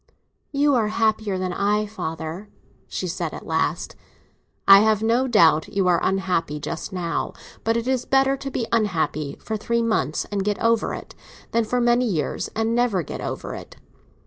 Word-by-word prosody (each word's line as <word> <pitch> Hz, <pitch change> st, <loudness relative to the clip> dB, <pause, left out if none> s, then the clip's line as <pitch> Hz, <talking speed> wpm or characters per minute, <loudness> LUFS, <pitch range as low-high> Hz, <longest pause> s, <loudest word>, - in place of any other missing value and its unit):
"You 285 Hz, 0 st, +3 dB
are 230 Hz, -4 st, +2 dB
happier 215 Hz, -2 st, 0 dB
than 185 Hz, -1 st, -2 dB
I, 210 Hz, +2 st, +1 dB
father," 175 Hz, -1 st, -6 dB, 0.4 s
she -, -, -4 dB
said, -, -, -3 dB
at -, -, -9 dB
last. -, -, -1 dB, 0.7 s
"I 195 Hz, 0 st, +10 dB
have 215 Hz, 0 st, +3 dB
no 235 Hz, +4 st, +2 dB
doubt 165 Hz, -9 st, +4 dB
you 200 Hz, -2 st, 0 dB
are 175 Hz, -2 st, +4 dB
unhappy 180 Hz, -5 st, 0 dB
just 165 Hz, +6 st, -5 dB
now. 175 Hz, -3 st, -2 dB, 0.3 s
But 225 Hz, +1 st, +1 dB
it 235 Hz, +1 st, -3 dB
is 260 Hz, -2 st, 0 dB
better 270 Hz, 0 st, +3 dB
to 275 Hz, 0 st, -6 dB
be 245 Hz, -3 st, -2 dB
unhappy 160 Hz, -9 st, 0 dB
for 220 Hz, -, -4 dB
three 235 Hz, +2 st, 0 dB
months 155 Hz, -, 0 dB
and 200 Hz, -1 st, -1 dB
get 205 Hz, 0 st, 0 dB
over 230 Hz, -1 st, +1 dB
it, -, -, -10 dB, 0.4 s
than 230 Hz, 0 st, +2 dB
for 250 Hz, +3 st, 0 dB
many 240 Hz, +1 st, +3 dB
years 160 Hz, -, -2 dB
and 225 Hz, +1 st, 0 dB
never 235 Hz, -7 st, +1 dB
get -, -, -6 dB
over -, -, -4 dB
it." -, -, -9 dB
210 Hz, 175 wpm, -23 LUFS, 180-230 Hz, 0.7 s, I